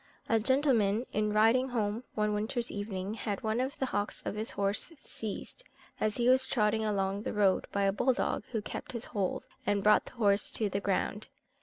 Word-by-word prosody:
A 225 - +3
gentleman 235 -3 +2
in 210 0 +1
riding 225 +5 +4
home 225 -1 -1
one 210 -1 +1
winter's 225 +3 -2
evening, 205 -1 -4
had 210 -3 -4
one 220 +1 0
of 260 +2 -2
the 265 - 0
hocks 205 -5 -2
of - - -3
his 215 +2 -3
horse 200 - -1
seized, 225 - -7 0.4
as 215 -1 0
he 240 0 +2
was 260 +1 +5
trotting 220 -2 +1
along 200 -1 0
the - - -3
road, 200 -2 +2
by 200 - 0
a 195 0 +3
bull 260 +5 +2
dog, - - -1
who 220 -4 -2
kept - - -6
his 235 -1 -4
hold, 200 -4 -1 0.2
and 200 -1 0
brought 210 0 +5
the - - -12
horse 205 -4 +2
to 215 -2 0
the 200 - -1
ground. 200 +2 -1
215 Hz, 200 wpm, -31 LUFS, 205-235 Hz, 0.4 s, was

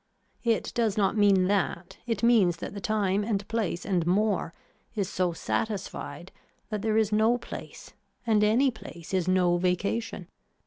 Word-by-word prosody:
It 230 -2 0
does 225 -4 0
not 200 +1 +2
mean 200 -3 +4
that, 190 -2 -1
it 230 -3 -2
means 210 -8 +4
that - - -6
the 200 - -6
time 205 -1 +1
and 205 -2 -2
place 220 -6 -2
and 185 -4 +1
more 200 -1 +1 0.4
is 200 -3 -1
so 185 -2 0
satisfied 185 -4 -4 0.4
that 210 -2 -3
there 220 0 +1
is 220 -1 +2
no 220 +3 +3
place, - - -9 0.3
and 215 -2 +3
any 240 +6 +4
place 175 -6 -11
is 185 -2 +1
no 180 -1 +3
vacation. 185 +2 -1
205 Hz, 160 wpm, -27 LUFS, 185-220 Hz, 0.4 s, mean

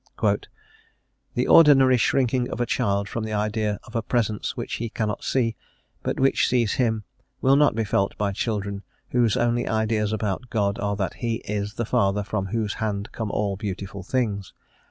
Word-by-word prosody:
* - - -22 1.1
The - - +1
ordinary 135 -5 +7
shrinking 125 +1 +1
of - - -5
a 120 - +2
child 100 -3 0
from 115 - -4
the 110 -1 -4
idea 105 0 -1
of 120 - -14
a 115 - +1
Presence 110 -2 -1
which - - -3
he 115 0 -3
cannot 105 -2 -2
see, 115 -4 +1 0.5
but - - -2
which 135 0 +3
sees 120 -5 +2
him, 110 -3 +1 0.4
will 135 +1 +4
not 145 -5 +4
be 115 - +1
felt 100 -2 0
by 100 -1 0
children 100 -1 -2 0.3
whose 120 -4 +2
only 120 0 +1
ideas 110 -1 0
about 110 +2 -2
God 100 -2 0
are 100 0 -1
that 100 -2 -2
He 115 -2 0
is 105 0 -3
the 120 - -2
Father 100 0 +1
from 100 -1 -2
whose 105 +1 -1
hand 105 -1 -2
come 110 -2 -4
all 100 -1 -1
beautiful 100 -1 -5
things. 100 -3 -2
110 Hz, 180 wpm, -24 LUFS, 100-120 Hz, 1.1 s, ordinary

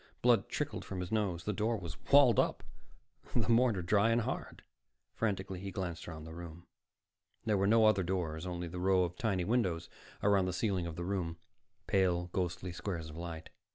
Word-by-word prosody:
Blood - - +4
trickled - - -3
from 95 - -5
his 90 -1 -4
nose. 100 -6 0
The 105 - -1
door 110 +3 0
was 85 -5 -6 0.2
walled 140 -6 +7
up, - - +1 0.7
the - - +2
mortar 115 -5 +4
dry 100 +5 +3
and 115 +1 +3
hard. - - -5 0.5
Frantically, 95 -4 -2
he 100 +1 -5
glanced 90 -3 -4
around 80 -2 -7
the 80 +1 -9
room. 85 0 -9 0.8
There 110 -2 +2
were 100 0 +2
no 110 +1 +5
other 110 -3 +5
doors, 85 -2 -2
only 90 -1 -4
the 90 +2 -6
row 95 0 +3
of 90 0 -3
tiny 95 -5 0
windows 90 -7 0 0.3
around 100 -2 +4
the 90 - -1
ceiling 95 -3 0
of 80 - -6
the 85 +1 -4
room, 90 -4 -2 0.5
pale, 90 -3 +1
ghostly 90 0 -2
squares 85 -3 -4
of - - -11
light. 85 -1 -7
90 Hz, 190 wpm, -33 LUFS, 85-100 Hz, 0.8 s, walled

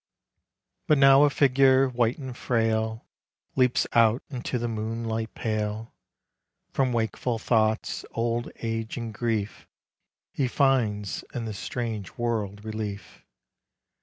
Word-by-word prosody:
But 150 - +5
now 135 +1 +7
a - - +4
figure 135 -1 +4
white 120 -2 0
and 130 -4 -7
frail 110 -2 0 0.5
Leaps 125 -2 +3
out 115 +1 +4
into 125 -1 -3
the 120 0 -2
moonlight 115 0 -3
pale. 110 0 -3 0.8
From 130 -2 +1
wakeful 115 +1 -1
thoughts, 110 0 +1
old 115 +1 -1
age 115 0 -3
and 115 -2 -5
grief 110 -2 -2 0.7
llr 130 -3 +2
finds 115 -8 +1
in 120 -2 -3
this 105 -3 -5
strange 110 -6 -4
world 110 -3 -2
relief. 110 -2 -6
115 Hz, 115 wpm, -26 LUFS, 110-125 Hz, 0.8 s, now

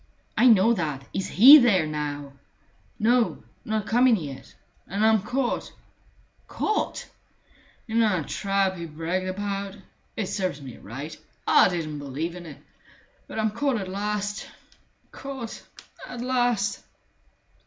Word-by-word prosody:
"I 250 - +5
know 225 0 +6
that. 150 - -3
Is 195 - -2
he 275 +9 +9
there 205 - +3
now?" 145 -2 -4 0.6
"No 235 +2 +2 0.2
not 215 -2 -2
come 245 +4 +4
in 240 - +5
yet 145 -8 -8 0.3
and 200 +3 0
I'm 220 -2 +4
caught." 250 +4 -2 0.8
"Caught!" 430 - -2 0.8
"In 225 0 0
that 185 -9 +1
trap 195 -2 0
he 170 0 -6
bragged 165 +4 -3
about. 200 +1 -3 0.4
It 215 - -1
serves 185 -6 -2
me 130 -4 -10
right. 140 +9 -8 0.3
I - - +6
didn't 155 -4 -4
believe 145 +5 -4
in 175 -1 -9
it. 150 -2 -10 0.7
But - - -8
I'm 220 -1 +1
caught 265 +3 0
at 190 -3 -5
last... 205 +1 -3 0.6
caught... 265 -4 -7 0.5
at 245 -1 -7
last!" 245 -5 0
200 Hz, 130 wpm, -25 LUFS, 165-225 Hz, 0.8 s, he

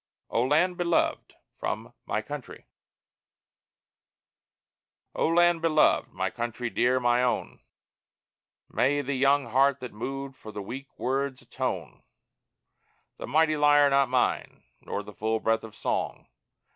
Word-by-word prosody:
O 115 - +2
LAND 160 +8 +2
BELOVED 170 -1 0 0.2
From - - -4
"My - - -1
Country" - - -8 2.5
O - - +1
Land 175 0 +4
beloved! 155 -2 +3
My 95 0 -2
Country, 120 0 -4
dear, 125 +1 +2
my 120 0 +2
own! 125 -1 -1 1.1
May 145 +3 +1
the 140 0 -3
young 140 +1 +3
heart 135 +2 +3
that 125 -1 -7
moved 135 +5 -5
For 110 - -10
the 105 -1 -6
weak 130 +7 -7
words 135 0 -2
atone; - - -4 1.2
The - - -7
mighty 155 0 +3
lyre 145 -1 +5
not 140 -1 +3
mine, 125 -1 0 0.2
nor 105 - -4
the 105 +1 -11
full 110 +2 -1
breath 115 0 +1
of 110 -2 -10
song! - - -2
135 Hz, 130 wpm, -27 LUFS, 120-145 Hz, 2.5 s, lyre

